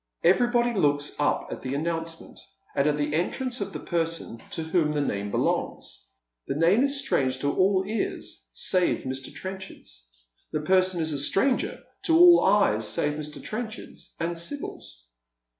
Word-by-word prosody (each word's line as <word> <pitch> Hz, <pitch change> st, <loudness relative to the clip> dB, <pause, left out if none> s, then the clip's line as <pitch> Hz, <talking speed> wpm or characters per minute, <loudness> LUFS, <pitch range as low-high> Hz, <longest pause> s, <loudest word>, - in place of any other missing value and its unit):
Everybody 240 Hz, +6 st, +3 dB
looks 145 Hz, -7 st, +1 dB
up 145 Hz, -, 0 dB
at -, -, -6 dB
the 130 Hz, +1 st, -3 dB
announcement, 165 Hz, +2 st, -4 dB, 0.4 s
and 140 Hz, -, +2 dB
at 150 Hz, 0 st, +1 dB
the 150 Hz, 0 st, -1 dB
entrance 245 Hz, -, -1 dB
of 200 Hz, 0 st, -3 dB
the -, -, -6 dB
person 165 Hz, -8 st, -2 dB
to 165 Hz, -, -4 dB
whom 160 Hz, -2 st, +1 dB
the 150 Hz, -, 0 dB
name 100 Hz, -7 st, -2 dB
belongs. -, -, -2 dB, 0.4 s
The -, -, -2 dB
name 170 Hz, -, +4 dB
is 280 Hz, 0 st, +3 dB
strange 135 Hz, -, 0 dB
to 140 Hz, -, 0 dB
all 190 Hz, 0 st, +3 dB
ears 195 Hz, -, -4 dB
save 180 Hz, -, +1 dB
Mr. 130 Hz, 0 st, -4 dB
Trenchard's. 185 Hz, -, -8 dB, 0.4 s
The 155 Hz, -, -1 dB
person 185 Hz, +1 st, +2 dB
is 160 Hz, -1 st, +1 dB
a 140 Hz, -, -1 dB
stranger 250 Hz, -, +1 dB, 0.2 s
to 325 Hz, -1 st, +4 dB
all 350 Hz, 0 st, +8 dB
eyes 110 Hz, -, +3 dB
save 150 Hz, -, +1 dB
]\Ir. 150 Hz, 0 st, -6 dB
Trenchard's 220 Hz, 0 st, -7 dB
and 170 Hz, +1 st, -1 dB
Sibyl's. 165 Hz, -, -7 dB
165 Hz, 160 wpm, -26 LUFS, 145-200 Hz, 0.4 s, all